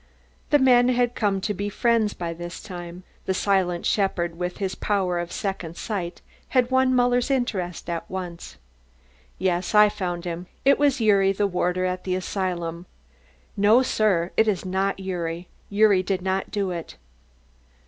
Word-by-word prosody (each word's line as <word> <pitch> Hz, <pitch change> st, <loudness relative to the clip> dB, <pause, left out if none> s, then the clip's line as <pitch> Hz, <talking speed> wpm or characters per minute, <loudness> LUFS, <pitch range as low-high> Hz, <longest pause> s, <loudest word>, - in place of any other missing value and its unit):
The 295 Hz, -, +6 dB
men 250 Hz, -2 st, +5 dB
had 245 Hz, -1 st, +2 dB
come 200 Hz, -4 st, 0 dB
to 210 Hz, +2 st, -1 dB
be 205 Hz, +1 st, -3 dB
friends 225 Hz, 0 st, +1 dB
by 170 Hz, -1 st, -4 dB
this 175 Hz, +1 st, -7 dB
time. 175 Hz, -2 st, -8 dB, 0.2 s
The 190 Hz, -, +1 dB
silent 185 Hz, -3 st, +1 dB
shepherd 175 Hz, -4 st, 0 dB
with 180 Hz, +1 st, -3 dB
the 190 Hz, -2 st, -3 dB
power 190 Hz, -4 st, 0 dB
of 175 Hz, 0 st, -4 dB
second 190 Hz, -7 st, -4 dB
sight 180 Hz, -5 st, -4 dB, 0.2 s
had 255 Hz, -1 st, +1 dB
won 260 Hz, 0 st, +3 dB
Muller's 245 Hz, +1 st, +2 dB
interest 200 Hz, -10 st, -2 dB
at 170 Hz, -1 st, -4 dB
once. 175 Hz, -, -6 dB, 0.8 s
"Yes, 185 Hz, +1 st, -1 dB
I 210 Hz, 0 st, +8 dB
found 180 Hz, -4 st, -4 dB
him. 175 Hz, +1 st, -5 dB, 0.2 s
It 275 Hz, +1 st, +4 dB
is 285 Hz, -2 st, +3 dB
Gyuri, 200 Hz, -4 st, +3 dB
the 205 Hz, +1 st, 0 dB
warder 180 Hz, -1 st, 0 dB
at 180 Hz, 0 st, -2 dB
the 185 Hz, -1 st, -1 dB
asylum." 175 Hz, -2 st, -3 dB, 0.7 s
"No, 215 Hz, +6 st, +5 dB
sir, 195 Hz, -8 st, +1 dB
it 220 Hz, -, +4 dB
is 195 Hz, -3 st, 0 dB
not 190 Hz, +1 st, 0 dB
Gyuri 175 Hz, -2 st, -4 dB, 0.2 s
Gyuri 205 Hz, -2 st, +4 dB
did 185 Hz, -1 st, -2 dB
not 190 Hz, 0 st, -1 dB
do 200 Hz, -3 st, -1 dB
it." 170 Hz, -2 st, -6 dB
190 Hz, 160 wpm, -24 LUFS, 175-215 Hz, 0.8 s, I